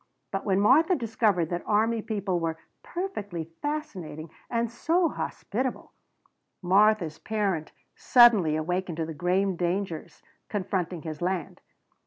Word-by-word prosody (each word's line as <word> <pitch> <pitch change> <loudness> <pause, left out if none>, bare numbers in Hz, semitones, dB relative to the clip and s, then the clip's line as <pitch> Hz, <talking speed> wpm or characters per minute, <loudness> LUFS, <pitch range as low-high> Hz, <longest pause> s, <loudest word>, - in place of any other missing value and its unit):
But 195 - -3
when 195 -1 +2
Martha 305 - +5
discovered 215 - +1
that 175 0 -1
army 220 +2 +2
people 200 -5 -2
were 165 -1 -2 0.2
"perfectly 205 - -5
fascinating 185 - -4 0.2
and 235 -1 -1
so 330 +8 +1
hospitable" 255 -1 -4 0.7
Martha's 190 -3 +3
parent 200 -8 -1 0.2
suddenly 220 -11 +6
awakened 175 +2 -2
to 165 - -1
the 160 - -6
grave 180 +3 0
dangers 175 -1 -3 0.3
confronting 185 -4 -2
his 155 -1 -6
land. 180 0 -2
195 Hz, 120 wpm, -27 LUFS, 170-225 Hz, 0.7 s, suddenly